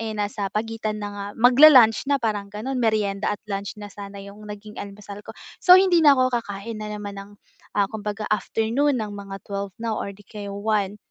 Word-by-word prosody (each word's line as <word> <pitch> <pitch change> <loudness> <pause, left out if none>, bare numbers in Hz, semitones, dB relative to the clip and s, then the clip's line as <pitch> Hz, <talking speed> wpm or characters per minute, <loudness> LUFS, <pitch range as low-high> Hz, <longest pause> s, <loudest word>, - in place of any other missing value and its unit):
eh, 220 -1 -4
nasa 205 -1 -2
pagitan 215 0 -3
na - - -3
nga 200 0 -6
mag-la-lunch 250 -1 +7
na 285 - +3
parang 210 -5 -2
gano'n, 250 +6 -4
merienda 210 -3 0
at 205 - -1 0.2
lunch 195 +1 -4
na 205 -1 -9
sana 200 0 -9
yung 210 +1 -12
naging 210 +1 -9
almusal 200 0 -9
ko. - - -12 0.2
So 360 0 +8
hindi 370 -3 +4
na 290 -3 +6
ako 255 0 +2
kakain 215 +1 -7
na 215 - -5
naman 205 -1 -7
ng, 200 - -12 0.5
ah, 205 - +4
kumbaga 210 0 -4
afternoon 225 +7 0
ng 215 -3 -4
mga 195 -1 -8
12:00 200 -1 -5
na 225 -1 -3
or - - -3
'di 205 - -18
kaya 205 -2 -8
1:00, 205 -1 -1
210 Hz, 200 wpm, -23 LUFS, 200-225 Hz, 0.5 s, So